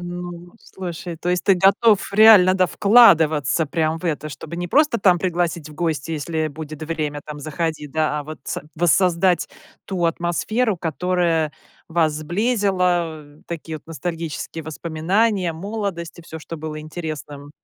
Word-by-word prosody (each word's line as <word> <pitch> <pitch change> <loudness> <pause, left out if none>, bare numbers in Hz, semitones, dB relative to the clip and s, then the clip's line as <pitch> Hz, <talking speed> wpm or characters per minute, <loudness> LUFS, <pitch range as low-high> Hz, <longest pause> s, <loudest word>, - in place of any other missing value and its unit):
Ну, 175 0 -7
слушай, 175 -2 -7
то 170 - -5
есть 180 0 +1
ты 195 - +5
готов 200 +3 +3
реально, 205 -3 +7
да, 185 -1 +3
вкладываться 160 - +4
прям 160 +1 -1
в - - -13
это. 155 -2 -2
Чтобы 155 +2 -8
не 175 0 -4
просто 295 - +3
там 180 -3 +4
пригласить 175 -3 -1
в 150 - -12
гости, 165 -2 -2
"если 155 +1 -2
будет 155 0 -8
время 155 -2 -3
там- 150 -1 -8
заходи", 155 0 -3
да, 150 0 0
а 145 - -8
вот 155 +1 -8
са - - -4
воссоздать 175 +1 +2 0.4
ту 185 -3 -2
атмосферу, 175 +7 0
которая 170 -1 0 0.4
вас 160 -2 +2
сблизила. 180 -2 0 0.2
Такие 160 -1 -5
вот - - -30
ностальгические 165 -1 -5
воспоминания, 175 +5 0
молодость, 190 -1 -5
и 170 - -10
всё, 160 -1 -9
что 165 +1 -8
было 155 0 -6
интересным. 155 -3 -7
170 Hz, 150 wpm, -21 LUFS, 155-180 Hz, 0.4 s, реально